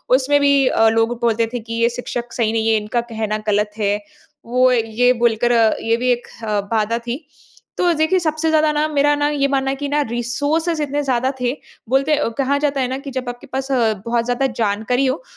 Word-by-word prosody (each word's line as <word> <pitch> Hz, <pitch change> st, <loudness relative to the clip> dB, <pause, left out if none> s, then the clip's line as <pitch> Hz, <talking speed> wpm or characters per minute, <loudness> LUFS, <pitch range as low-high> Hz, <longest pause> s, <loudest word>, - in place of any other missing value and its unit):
उसमें 280 Hz, +2 st, +2 dB
भी 280 Hz, -2 st, +4 dB
अ, 225 Hz, -, +3 dB
लोग 225 Hz, +1 st, 0 dB
बोलते 230 Hz, -1 st, +1 dB
थे 245 Hz, -, -2 dB
कि 230 Hz, 0 st, -8 dB
ये 235 Hz, -, +4 dB
शिक्षक 240 Hz, 0 st, -5 dB
सही 225 Hz, -3 st, 0 dB
नहीं 225 Hz, 0 st, 0 dB
हैं, 220 Hz, -1 st, +3 dB
इनका 220 Hz, +3 st, -1 dB
कहना 220 Hz, -1 st, -2 dB
गलत 210 Hz, 0 st, +1 dB
है, 205 Hz, -1 st, 0 dB, 0.5 s
वो 250 Hz, +2 st, +3 dB
ये 235 Hz, +1 st, +2 dB
बोलकर 235 Hz, 0 st, +2 dB
अ, 225 Hz, -2 st, +4 dB
ये 230 Hz, 0 st, +1 dB
भी 250 Hz, +1 st, -1 dB
एक 245 Hz, 0 st, -2 dB, 0.2 s
अ, 210 Hz, -2 st, 0 dB
बाधा 225 Hz, +1 st, +1 dB
थी, 260 Hz, +6 st, -4 dB, 0.5 s
तो 350 Hz, -1 st, +3 dB
देखिए 315 Hz, +4 st, +2 dB
सबसे 315 Hz, -1 st, -1 dB
ज़्यादा 310 Hz, -1 st, +3 dB
ना 300 Hz, +1 st, +1 dB
मेरा 290 Hz, -1 st, +2 dB
ना 290 Hz, 0 st, +1 dB
ये 285 Hz, -2 st, +1 dB
मानना 270 Hz, -1 st, 0 dB
है -, -, -2 dB
कि 285 Hz, +1 st, -4 dB
ना 295 Hz, +1 st, +1 dB
रिसोर्सेज़ 295 Hz, +8 st, -1 dB
इतने 290 Hz, 0 st, -2 dB
ज़्यादा 260 Hz, -1 st, 0 dB
थे, 245 Hz, 0 st, +1 dB, 0.4 s
बोलते 275 Hz, +4 st, +2 dB
अ, 295 Hz, -, 0 dB
कहा 280 Hz, +1 st, +1 dB
जाता 280 Hz, -2 st, 0 dB
है 255 Hz, -, 0 dB
ना 260 Hz, +1 st, -3 dB
कि 275 Hz, -, -5 dB
जब 255 Hz, -1 st, -4 dB
आपके 245 Hz, 0 st, -9 dB
पास 270 Hz, +1 st, -3 dB
अ, 235 Hz, -4 st, +2 dB
बहुत 235 Hz, 0 st, 0 dB
ज़्यादा 245 Hz, +2 st, 0 dB
जानकारी 220 Hz, +5 st, 0 dB
हो, 265 Hz, -, -1 dB
250 Hz, 225 wpm, -19 LUFS, 230-285 Hz, 0.5 s, भी